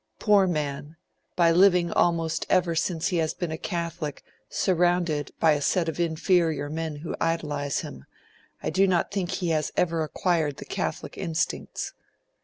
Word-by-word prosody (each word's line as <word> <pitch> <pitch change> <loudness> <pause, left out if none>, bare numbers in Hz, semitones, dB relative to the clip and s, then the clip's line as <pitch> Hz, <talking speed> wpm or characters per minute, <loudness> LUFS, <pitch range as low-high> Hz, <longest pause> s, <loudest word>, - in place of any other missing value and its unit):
'Poor 205 -3 +4
man, 150 -2 -3 0.4
by 170 -2 +4
living 175 -1 +4
almost 165 -2 +1
ever 180 -2 +3
since 165 0 0
he 180 - 0
has 160 -1 0
been 175 -3 -3
a - - -2
Catholic, 170 -5 -4 0.3
surrounded 175 -5 +1
by 160 - +5
a 145 -1 +1
set 170 +3 +1
of 160 0 -3
inferior 160 -3 +1
men 160 -1 -3
who 150 +3 -5
idolise 150 -4 -1
him, 65 0 -9 0.6
I - - -1
do 195 +1 +3
not 180 -2 +1
think 195 -3 -2
he 180 -3 -2
has 155 -2 0
ever 165 -2 +1
acquired 155 -2 0
the - - -8
Catholic - - -4
instincts.' 165 0 -2
165 Hz, 160 wpm, -26 LUFS, 155-175 Hz, 0.6 s, by